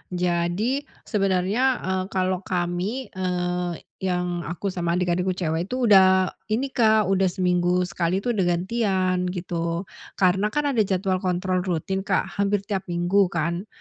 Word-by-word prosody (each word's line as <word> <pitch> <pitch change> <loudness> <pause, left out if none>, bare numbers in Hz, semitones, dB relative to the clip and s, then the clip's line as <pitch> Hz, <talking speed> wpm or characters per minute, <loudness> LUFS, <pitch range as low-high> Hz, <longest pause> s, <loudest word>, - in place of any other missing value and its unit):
Jadi, 180 - 0 0.2
sebenarnya, 195 +2 0 0.2
eee, 190 0 -1
kalau 185 -1 0
kami, 185 +7 -3
eee, 180 -2 -2 0.2
yang 180 -3 -2
aku 180 +4 -3
sama 170 -1 -1
adik-adikku 180 +1 0
cewek 170 0 -1
itu, 255 +2 -2
udah 190 -1 +6 0.2
ini, 245 +5 -1
Kak, 220 -3 +4
udah 190 0 +3
seminggu 180 -1 +1
sekali, 180 +2 -1
udah 215 -7 +1
gantian, 185 0 0
gitu. 170 -1 -3 0.3
Karena 190 +2 +3
kan 290 +6 0
ada 245 - 0
jadwal 190 -1 0
kontrol 185 0 0
rutin, 180 +1 -2
Kak, 195 0 -1
hampir 200 0 +1
tiap 195 -2 -3
minggu 175 +3 +2
kan. 170 +4 -2
185 Hz, 140 wpm, -24 LUFS, 175-195 Hz, 0.3 s, udah